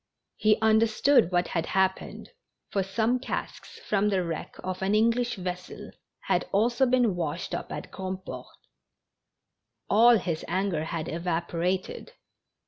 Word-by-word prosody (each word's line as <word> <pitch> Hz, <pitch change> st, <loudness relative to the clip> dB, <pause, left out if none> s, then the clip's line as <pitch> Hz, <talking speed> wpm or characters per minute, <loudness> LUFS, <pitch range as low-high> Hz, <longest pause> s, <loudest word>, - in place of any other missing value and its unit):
He 215 Hz, 0 st, +3 dB
understood 220 Hz, 0 st, +4 dB
Avhat 175 Hz, -1 st, 0 dB
had 165 Hz, -2 st, -1 dB
happened, 190 Hz, 0 st, -1 dB, 0.4 s
for 195 Hz, -, +1 dB
some 220 Hz, +6 st, 0 dB
casks 260 Hz, -, -6 dB
from 210 Hz, 0 st, +2 dB
the 190 Hz, -3 st, +1 dB
wreck 165 Hz, -2 st, -5 dB
of 185 Hz, 0 st, -4 dB
an 195 Hz, +2 st, +1 dB
English 235 Hz, +3 st, +2 dB
vessel 180 Hz, -1 st, -6 dB, 0.3 s
had -, -, 0 dB
also 235 Hz, +6 st, +2 dB
been 245 Hz, -6 st, +2 dB
washed 165 Hz, -1 st, -3 dB
up -, -, -4 dB
at -, -, -6 dB
Grandport. 190 Hz, 0 st, -6 dB, 1.4 s
All 235 Hz, +3 st, +7 dB
his 175 Hz, -5 st, -3 dB
anger 180 Hz, -3 st, -1 dB
had 160 Hz, 0 st, -4 dB
evaporated. 170 Hz, +2 st, -2 dB
190 Hz, 130 wpm, -27 LUFS, 175-220 Hz, 1.4 s, All